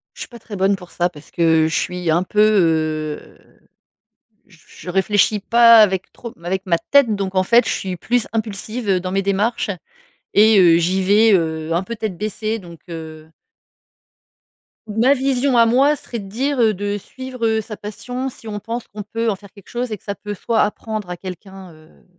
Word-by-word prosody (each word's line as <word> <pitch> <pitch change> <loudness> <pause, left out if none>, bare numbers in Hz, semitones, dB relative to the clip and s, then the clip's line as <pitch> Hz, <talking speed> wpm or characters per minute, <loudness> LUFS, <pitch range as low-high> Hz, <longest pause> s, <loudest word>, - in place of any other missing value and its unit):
Je - - -11
suis - - -5
pas 235 - -12
très 215 -1 -9
bonne 195 +1 +1
pour 180 -2 -14
ça 175 0 0
parce 155 -4 -15
que 160 -2 +3
je 160 - -2
suis 180 -1 -2
un 170 +3 +2
peu, 210 +3 -3
heu, 160 -7 +1 1.1
j 175 - -21
je - - -11
réfléchis 205 +3 +2
pas 230 +2 +6
avec 190 -4 +3
trop 235 -2 -10
avec 190 +3 -3
ma 170 -3 +1
tête. 275 -7 +4
Donc 195 -1 -4
en 185 - +3
fait 235 +5 +4
je - - 0
suis 185 -2 -3
plus 240 +5 0
impulsive, 220 +1 -4
heu, 185 -2 +3
dans 185 0 -5
mes 195 +1 +1
démarches. 200 +4 0 0.7
Et 215 0 +6
heu, 170 -2 +6
j'y 185 +3 +1
vais, 210 +4 +4
heu, 160 -2 -1
un 170 +2 +1
peu 230 +5 -6
tête 215 -4 -4
baissée 215 +2 -3
donc, 170 -3 -12
heu 160 -2 -9 1.6
Ma 230 +6 +3
vision 265 -1 +1
à 230 - +6
moi 270 +6 +3
serait 240 -4 -7
de 195 - -9
dire, 265 +6 -1
heu, 220 -2 +4
de 205 +2 -2
suivre, 260 +3 -9
heu, 220 0 +1
sa 215 0 -7
passion 245 +6 -5
si 230 - -13
on 210 -1 -4
pense 230 +3 -5
qu'on 210 - -8
peut 225 +3 -2
en - - -2
faire 200 0 -16
quelque 200 -2 -18
chose 245 0 -3
et 215 - -3
que - - -31
ça 200 - -4
peut 205 +1 -7
soit 225 +3 0
apprendre 210 -1 -3
à 180 - -5
quelqu'un, 190 0 -10
heu, 155 +1 -21
205 Hz, 205 wpm, -19 LUFS, 180-225 Hz, 1.6 s, pas